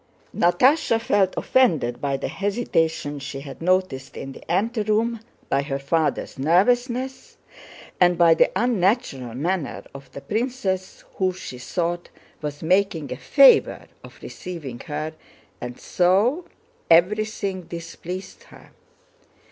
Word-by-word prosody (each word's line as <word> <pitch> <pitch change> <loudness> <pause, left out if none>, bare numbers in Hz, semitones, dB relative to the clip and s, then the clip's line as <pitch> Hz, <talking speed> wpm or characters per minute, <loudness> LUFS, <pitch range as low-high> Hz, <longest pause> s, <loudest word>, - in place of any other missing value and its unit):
Natásha 230 - +3
felt 205 -4 +1
offended 155 - +2
by 140 -1 0
the - - -3
hesitation 165 -8 -1
she 135 0 -6
had 140 +1 -10
noticed 180 -7 0
in 135 - -6
the 135 - -9
anteroom, 220 +3 0 0.3
by 135 - +1
her 140 -1 -3
father's 145 0 -1
nervousness, 245 - +1 0.6
and 175 -1 +4
by 170 -1 +6
the - - +4
unnatural 190 - 0
manner 170 +3 -2
of 140 0 -12
the 140 - -8
princess 215 - -3
who—she 185 -9 -2
thought—was 165 -1 -5
making 170 -5 +1
a - - -2
favor 275 - +5 0.2
of - - -13
receiving 155 -10 -7
her, 155 +1 -4 0.5
and 125 0 -7
so 205 - +2 0.4
everything 195 +2 +2
displeased 170 +2 -8
her. - - -17
180 Hz, 115 wpm, -23 LUFS, 145-210 Hz, 0.6 s, by